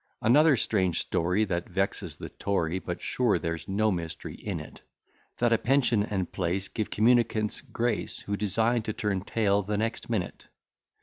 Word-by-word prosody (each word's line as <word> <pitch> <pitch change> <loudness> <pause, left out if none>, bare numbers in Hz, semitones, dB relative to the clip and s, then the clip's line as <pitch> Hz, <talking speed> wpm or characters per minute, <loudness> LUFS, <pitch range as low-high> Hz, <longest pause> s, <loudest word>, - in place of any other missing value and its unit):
Another 145 +4 +5
strange 95 -7 +1
story 90 +6 +1
That 85 -3 -3
vexes - - -2
the - - -7
Tory, 95 -3 -1
But 90 -1 -6
sure 125 -5 +2
there's 85 0 -4
no 105 +2 +2
mystery 85 -2 -4
in - - -5
it, - - -11 0.6
That 120 -1 +3
a 115 - +3
pension 125 -4 +3
and 95 -3 -2
place 95 +2 -1
Give 110 - -3
communicants 110 -1 +2
grace, 120 -2 -1
Who 100 - -3
design 110 +4 +1
to 110 0 -4
turn 100 -3 -1
tail 100 0 +1
the 105 +1 -2
next 115 +2 -2
minute. 105 -7 -3
105 Hz, 165 wpm, -28 LUFS, 95-115 Hz, 0.6 s, Another